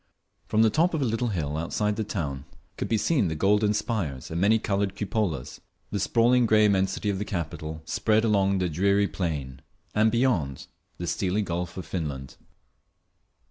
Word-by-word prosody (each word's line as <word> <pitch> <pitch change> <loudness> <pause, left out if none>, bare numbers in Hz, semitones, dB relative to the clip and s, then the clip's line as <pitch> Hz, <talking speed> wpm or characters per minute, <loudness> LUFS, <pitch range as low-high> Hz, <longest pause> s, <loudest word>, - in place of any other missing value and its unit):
From 110 0 +3
the 110 - +4
top 170 +2 +2
of 155 - -1
a - - +1
little 115 +1 0
hill 80 -9 -2
outside 105 +6 -1
the 110 - -1
town 75 -10 -4 0.3
could - - -3
be 115 - +2
seen 125 - +2
the 80 - -2
golden 105 +5 +3
spires 95 - -3
and 85 +2 -2
many 105 +3 +5
coloured 100 -2 -1
cupolas, 100 - -2 0.3
the 100 - -1
sprawling 120 +4 +3
grey 110 0 +5
immensity 95 0 +1
of 95 - -3
the - - -1
capital 80 -4 -5
spread 110 +5 +1
along 100 -3 +2
the 90 -1 0
dreary 100 +5 +2
plain, 75 -6 -4 0.3
and 110 +1 +3
beyond, 110 - 0 0.3
the 85 - -4
steely 95 +4 0
Gulf 85 -1 -4
of 90 - -5
Finland. 70 -4 -5
100 Hz, 175 wpm, -26 LUFS, 80-110 Hz, 0.3 s, many